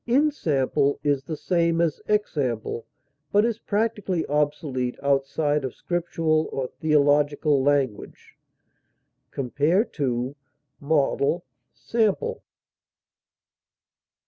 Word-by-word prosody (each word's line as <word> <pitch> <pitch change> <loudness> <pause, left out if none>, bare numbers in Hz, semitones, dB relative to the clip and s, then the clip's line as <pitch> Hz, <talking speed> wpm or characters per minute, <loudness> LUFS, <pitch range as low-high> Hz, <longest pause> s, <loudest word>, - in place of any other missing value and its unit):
Ensample 155 - +1
is 145 -2 +1
the 155 - -4
same 170 -1 +1
as 165 -3 0
example, 135 - -1 0.4
but 205 +2 +4
is 230 -1 -1
practically 205 -5 -1
obsolete 145 -4 -1
outside 140 +1 +1
of 130 - -4
Scriptural 165 -2 0
or 135 - -2
theological 145 -1 +3
language. 135 -6 -1 0.9
Compare 145 - +1 0.9
MODEL; 145 +2 +1 0.3
SAMPLE. 235 - 0
150 Hz, 80 wpm, -25 LUFS, 140-180 Hz, 0.9 s, but